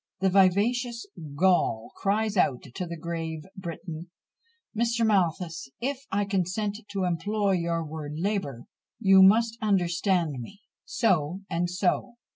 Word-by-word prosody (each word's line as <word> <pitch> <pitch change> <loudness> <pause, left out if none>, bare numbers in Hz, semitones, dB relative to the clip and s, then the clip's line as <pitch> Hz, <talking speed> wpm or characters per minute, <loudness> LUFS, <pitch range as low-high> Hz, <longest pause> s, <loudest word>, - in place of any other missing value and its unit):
The 190 -1 +2
vivacious 230 +6 +2 0.3
Gaul 160 -9 +2
cries 210 +2 0
out 135 -9 +2
to 180 - -4
the 170 0 -6
grave 165 -1 -4
Briton, 170 -2 -7 0.7
Mr. 235 +1 +1
Malthus, 170 -7 0
"If 275 +2 -3
I 200 +1 +1
consent 200 +2 -1
to 195 -2 -1
employ 200 +4 0
your 170 -2 0
word 150 -1 -6
labour, 165 - -2 0.4
you 195 -3 +6
must 225 +4 +5
understand 175 -5 +1
me," 195 - -10 0.3
so 185 -5 +1
and 175 +1 0
so! 180 +6 0
190 Hz, 125 wpm, -27 LUFS, 170-210 Hz, 0.7 s, you